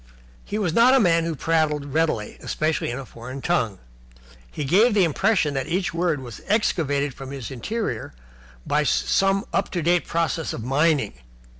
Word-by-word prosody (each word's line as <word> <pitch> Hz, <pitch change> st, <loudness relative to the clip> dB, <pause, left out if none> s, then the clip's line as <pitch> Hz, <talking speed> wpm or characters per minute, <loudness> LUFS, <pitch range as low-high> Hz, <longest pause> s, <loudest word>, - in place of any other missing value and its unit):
He 205 Hz, -, -4 dB
was 190 Hz, -7 st, 0 dB
not 245 Hz, +5 st, +6 dB
a -, -, +6 dB
man 165 Hz, -6 st, +3 dB
who 165 Hz, -1 st, -2 dB
prattled 150 Hz, -2 st, 0 dB
readily, 155 Hz, -10 st, 0 dB
especially 155 Hz, +1 st, -1 dB
in 120 Hz, -, -3 dB
a 135 Hz, -, -6 dB
foreign 125 Hz, +3 st, -9 dB
tongue. 130 Hz, -, 0 dB, 0.7 s
He 150 Hz, -, -4 dB
gave 210 Hz, -, +4 dB
the 200 Hz, -, +5 dB
impression 175 Hz, -1 st, +2 dB
that 135 Hz, -2 st, -2 dB
each 180 Hz, +1 st, -1 dB
word 165 Hz, -4 st, 0 dB
was 120 Hz, -4 st, -9 dB
excavated 145 Hz, -, +1 dB
from 135 Hz, +1 st, -9 dB
his 135 Hz, -2 st, -6 dB
interior 130 Hz, -, -4 dB, 0.5 s
by 150 Hz, -, +2 dB
some 195 Hz, +7 st, +2 dB
up 195 Hz, -, 0 dB
to 175 Hz, -3 st, -3 dB
date 175 Hz, +2 st, +2 dB
process 165 Hz, -1 st, -1 dB
of 110 Hz, -, -5 dB
mining. 140 Hz, -2 st, +1 dB
160 Hz, 170 wpm, -23 LUFS, 135-180 Hz, 0.7 s, not